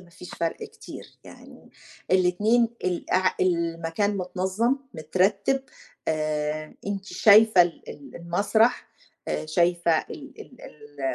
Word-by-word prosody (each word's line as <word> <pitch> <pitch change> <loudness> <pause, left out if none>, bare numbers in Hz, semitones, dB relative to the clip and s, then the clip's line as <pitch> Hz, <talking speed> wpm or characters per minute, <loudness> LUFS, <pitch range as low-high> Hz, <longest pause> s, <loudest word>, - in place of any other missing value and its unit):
ما 180 -2 -18
فيش 180 +1 -12
فرق 165 -1 -2
كتير، - - -10 0.2
يعني - - -15 0.4
الاتنين 205 +6 +3 0.2
ال 180 -1 -3
اع 185 0 +2
المكان 170 +3 0
متنظَّم، 190 +7 -1 0.2
مترتِّب 195 - 0 0.5
آآ 155 0 -2
أنتِ 200 -1 -4
شايفة 215 -2 +6
ال 170 -1 -5
ال 145 - -12
المسرح، 205 +8 +1 0.4
آآ - - -3
شايفة 170 0 +2
ال 285 -2 -9
ال 255 - -14
ال 145 -2 -6
180 Hz, 120 wpm, -25 LUFS, 165-205 Hz, 0.5 s, شايفة